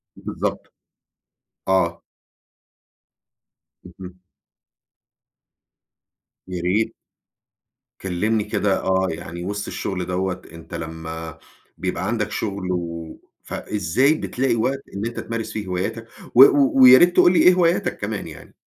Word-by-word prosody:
بالضبط، -, -, -5 dB, 1.0 s
آه. 85 Hz, -3 st, +1 dB, 1.8 s
اهم. 90 Hz, +1 st, -12 dB, 2.3 s
ياريت. 90 Hz, +4 st, -1 dB, 1.1 s
كلمني 105 Hz, +4 st, 0 dB
كده 105 Hz, -1 st, 0 dB
آه 95 Hz, 0 st, +1 dB
يعني 85 Hz, +2 st, -6 dB
وسط 100 Hz, +2 st, -4 dB
الشغل 90 Hz, -2 st, -4 dB
دوّة، 95 Hz, 0 st, -2 dB
أنت 85 Hz, +2 st, -13 dB
لما 80 Hz, -1 st, -7 dB, 0.4 s
بيبقى -, -, -3 dB
عندك 105 Hz, -2 st, -1 dB
شغل، 100 Hz, -3 st, -3 dB
و 85 Hz, -2 st, -4 dB, 0.3 s
فإزاي 105 Hz, -, 0 dB
بتلاقي 130 Hz, -5 st, -1 dB
وقت 135 Hz, +4 st, -1 dB
إن 100 Hz, +3 st, -3 dB
أنت 120 Hz, -, -4 dB
تمارس 115 Hz, -1 st, -4 dB
فيه 105 Hz, -3 st, -5 dB
هواياتك؟ 95 Hz, +5 st, -3 dB, 0.3 s
و 130 Hz, -, +11 dB
و 140 Hz, 0 st, +5 dB
ويا 130 Hz, 0 st, +10 dB
ريت 175 Hz, 0 st, +5 dB
تقول 175 Hz, -, +6 dB
لي -, -, +3 dB
إيه 180 Hz, -, +7 dB
هواياتك 175 Hz, -1 st, +1 dB
كمان -, -, -4 dB
يعني؟ -, -, -12 dB
95 Hz, 110 wpm, -22 LUFS, 90-115 Hz, 2.3 s, و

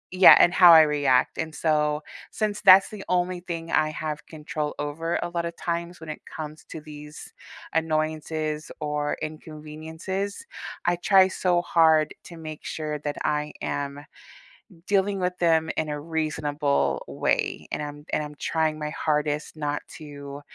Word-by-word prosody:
yeah, 185 Hz, 0 st, +10 dB
and 175 Hz, -, +5 dB
how 175 Hz, -3 st, +9 dB
I 160 Hz, -, +10 dB
react, 145 Hz, -4 st, +2 dB
and 160 Hz, -1 st, -3 dB
so, 150 Hz, -1 st, +1 dB, 0.3 s
since 215 Hz, -1 st, -2 dB
that's 195 Hz, -1 st, +8 dB
the 210 Hz, -2 st, -8 dB
only 180 Hz, 0 st, +1 dB
thing 165 Hz, -2 st, -6 dB
I 155 Hz, -, +3 dB
have 155 Hz, -1 st, -5 dB
control 155 Hz, -1 st, -4 dB
over 165 Hz, +3 st, -2 dB
a 175 Hz, -, -3 dB
lotta 170 Hz, -1 st, -2 dB
times 170 Hz, +1 st, -4 dB
when 160 Hz, -, -10 dB
it 155 Hz, -, -6 dB
comes 155 Hz, 0 st, -8 dB
to 160 Hz, -, -7 dB
these 150 Hz, 0 st, -11 dB, 0.4 s
annoyances 155 Hz, -1 st, -1 dB
or 150 Hz, 0 st, -2 dB
inconveniences, 160 Hz, -, -6 dB, 0.4 s
I 175 Hz, 0 st, +2 dB
try 190 Hz, +1 st, +5 dB
so 180 Hz, -2 st, +1 dB
hard 160 Hz, -3 st, +4 dB
to 170 Hz, -, -11 dB
make 155 Hz, -1 st, -8 dB
sure 150 Hz, -1 st, -4 dB
that 145 Hz, 0 st, -4 dB
I 150 Hz, 0 st, -1 dB
am 145 Hz, 0 st, -4 dB, 0.8 s
dealing 200 Hz, 0 st, +1 dB
with 180 Hz, 0 st, -1 dB
them 160 Hz, -2 st, +3 dB
in 155 Hz, -, -1 dB
a 150 Hz, 0 st, -3 dB
reasonable 150 Hz, -2 st, -1 dB
way, -, -, -1 dB
and -, -, -2 dB
I'm 145 Hz, 0 st, -8 dB
and 155 Hz, -, +1 dB
I'm 150 Hz, 0 st, -8 dB
trying 160 Hz, 0 st, -1 dB
my 150 Hz, 0 st, -3 dB
hardest 150 Hz, 0 st, -1 dB
not 145 Hz, -1 st, -2 dB, 0.2 s
to, 145 Hz, -2 st, -9 dB
155 Hz, 155 wpm, -25 LUFS, 150-170 Hz, 0.8 s, yeah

